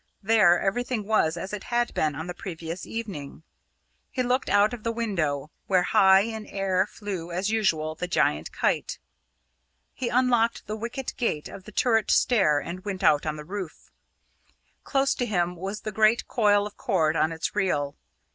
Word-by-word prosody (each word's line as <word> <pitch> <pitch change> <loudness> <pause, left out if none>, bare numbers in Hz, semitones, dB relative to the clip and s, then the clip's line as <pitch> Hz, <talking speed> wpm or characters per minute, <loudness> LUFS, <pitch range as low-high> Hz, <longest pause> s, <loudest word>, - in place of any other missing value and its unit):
There 200 -5 +5
everything 235 +2 -1
was 175 -6 +2
as 190 +4 -6
it 210 - -5
had 240 0 0
been 155 -2 0
on 160 +3 -5
the 180 - -5
previous 170 -1 -7
evening. 190 -10 -6 0.7
He 255 - -1
looked 250 +2 0
out 205 +3 +4
of 240 - -6
the 230 - -1
window 160 - -2 0.2
where 185 -2 +3
high 190 +1 +5
in 220 0 -5
air 195 -1 0
flew, 195 -6 -6
as 185 +5 -1
usual, 160 -8 +1
the 180 +3 -4
giant 175 - +1
kite. - - -1 1.0
He 250 -2 -3
unlocked 240 -2 +2
the 210 - -4
wicket 235 +4 -5
gate 155 -11 -1
of 190 - -11
the 210 - -10
turret 225 0 +2
stair 190 -12 +4
and 175 +5 -5
went 195 -2 -4
out 150 -2 +4
on 155 - -1
the 150 0 -9
roof. 190 -2 -7 0.9
Close 275 0 +1
to 245 - -2
him 180 -3 0
was 195 +4 -5
the 215 - -4
great 215 +2 +3
coil 205 -3 +3
of 210 - -9
cord 165 -8 +1
on 160 0 +2
its 165 +4 -4
reel. 145 -8 0
195 Hz, 175 wpm, -26 LUFS, 170-225 Hz, 1.0 s, There